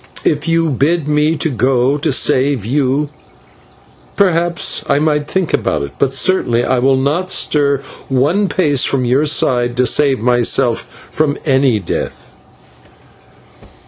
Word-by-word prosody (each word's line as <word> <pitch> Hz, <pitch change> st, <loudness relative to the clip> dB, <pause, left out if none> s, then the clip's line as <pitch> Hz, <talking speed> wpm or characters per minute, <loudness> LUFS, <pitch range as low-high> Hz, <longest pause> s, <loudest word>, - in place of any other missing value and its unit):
If 150 Hz, +1 st, 0 dB
you 165 Hz, -1 st, +1 dB
bid 150 Hz, +4 st, 0 dB
me 150 Hz, +2 st, +1 dB
to 155 Hz, 0 st, -2 dB
go 130 Hz, +2 st, +1 dB
to 150 Hz, +1 st, -1 dB
save 130 Hz, -3 st, +1 dB
you, 140 Hz, +3 st, 0 dB, 1.1 s
perhaps 175 Hz, -3 st, +1 dB
I 140 Hz, -, +3 dB
might 150 Hz, -1 st, 0 dB
think 190 Hz, -4 st, -2 dB
about -, -, -1 dB
it; 70 Hz, -, -6 dB
but 135 Hz, -1 st, 0 dB
certainly 125 Hz, -7 st, +1 dB
I 130 Hz, -, 0 dB
will 135 Hz, +1 st, +2 dB
not 150 Hz, +8 st, -1 dB
stir 140 Hz, -5 st, 0 dB, 0.3 s
one 150 Hz, +10 st, +1 dB
pace 145 Hz, -8 st, +1 dB
from 130 Hz, -2 st, 0 dB
your 135 Hz, +5 st, +1 dB
side 120 Hz, -4 st, 0 dB
to 125 Hz, -, +2 dB
save 135 Hz, +2 st, +2 dB
myself 120 Hz, +1 st, +1 dB, 0.2 s
from 150 Hz, -2 st, -1 dB
any 135 Hz, -5 st, +2 dB
death." 95 Hz, -4 st, -6 dB
140 Hz, 140 wpm, -15 LUFS, 130-155 Hz, 1.1 s, I